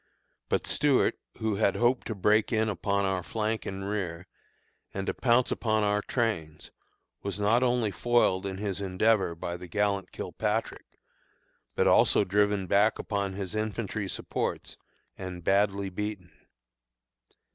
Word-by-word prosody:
But - - 0
Stuart, 140 -2 +2 0.2
who 110 -3 -1
had 110 - +2
hoped 120 +2 +1
to 110 - -3
break 105 +2 +2
in 110 -1 +2
upon 100 +1 0
our 95 -1 0
flank 110 +4 -2
and 95 0 -4
rear, 95 -4 -3 0.7
and 95 0 -2
to - - -1
pounce 120 0 +2
upon 110 -2 +1
our 105 0 +2
trains, 85 -13 -2 0.5
was 100 +1 -4
not 110 +4 +3
only 120 -4 +2
foiled 100 -3 +2
in 95 -1 -4
his 100 -1 -3
endeavor 95 -1 +2
by 85 +1 -4
the 90 0 -10
gallant 100 +1 0
Kilpatrick, 110 +1 -3 0.8
but - - +2
also - - +5
driven 100 0 +1
back 100 +4 +3
upon 100 -2 -2
his 95 -1 -5
infantry 110 -2 -3
supports, - - -3 0.4
and 90 -2 -6
badly 100 +1 +1
beaten. 100 -3 -5
100 Hz, 140 wpm, -28 LUFS, 95-110 Hz, 0.8 s, also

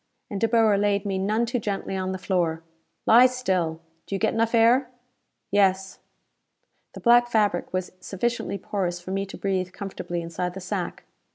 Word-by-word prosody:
And 200 - -4
De 225 - +4
Boer 220 -3 +3
laid 205 0 +1
me 195 -1 -1
none 215 +5 +1
too 245 +1 -1
gently 200 -2 -3
on 185 0 -2
the 190 - -3
floor. 170 -4 -1 0.4
"Lie 245 +3 +8
still. 185 -11 -1 0.3
Do 195 - -3
you - - -2
get 220 - +1
enough 230 +1 +1
air?" 240 +3 +4 0.6
"Yes." 195 -1 +2 0.9
The - - -8
black 240 0 +5
fabric 210 -6 +1
was 185 -1 -3
sufficiently 215 +2 -2
porous 180 -2 -3
for 180 +1 -8
me 195 +1 -2
to - - -9
breathe 185 -2 -2
comfortably 175 -3 -5
inside 175 +2 -4
the - - -5
sack. 185 -1 -4
195 Hz, 175 wpm, -25 LUFS, 185-225 Hz, 0.9 s, Lie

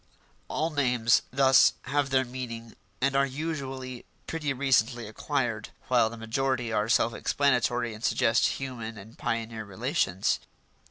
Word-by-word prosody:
All 160 +2 -1
names 125 -5 +3
thus 130 0 +6
have 140 +1 0
their 130 0 +2
meaning 115 -3 -7 0.3
and 135 +1 +2
are 140 - +4
usually 135 -3 -4 0.2
pretty 155 -3 -2
recently 125 -3 +1
acquired, 110 - -2 0.2
while 110 - +4
the 115 - -9
majority 120 +1 -1
are 105 +1 0
self 115 0 +3
explanatory 125 -4 +1
and 110 +2 -11
suggest 120 -2 +3
human 115 -5 -5
and 110 +4 -12
pioneer 115 -1 -3
relations. 95 -1 0
125 Hz, 130 wpm, -28 LUFS, 115-135 Hz, 0.3 s, thus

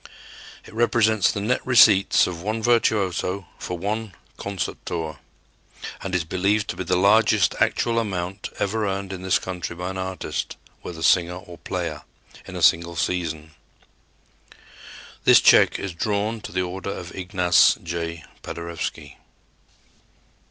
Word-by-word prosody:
It - - -14
represents 110 -3 +3
the - - -4
net 125 +5 0
receipts 110 -6 +5
of 85 -2 -5
one 110 +3 -3
virtuoso 100 -5 +1
for 90 - -5
one 105 +1 -4 0.2
concert 100 -3 -5
tour, 80 -3 -4 0.8
and 95 -1 -3
is 90 - +1
believed 95 +5 0
to - - -3
be - - -4
the 90 +1 0
largest 100 -1 +4
actual 115 -1 +2
amount 95 -2 -4
ever 105 +1 -1
earned 95 0 -3
in 90 - -7
this 95 0 +2
country 90 -2 -5
by 90 +2 -4
an 95 - -6
artist, 95 0 -4 0.2
whether 80 -2 -7
singer 90 0 +3
or 90 -2 -11
player, - - -4 0.5
in - - -8
a - - -3
single 85 +1 +3
season. 80 -3 -2 1.7
This - - +7
check - - +5
is 95 -2 -5
drawn 105 +5 -2
to - - -8
the 95 +1 0
order 90 +1 -5
of - - -6
Ignace 90 -1 +3
J. 85 -1 -4 0.2
Paderewski. 85 0 -6
95 Hz, 140 wpm, -23 LUFS, 85-105 Hz, 1.7 s, This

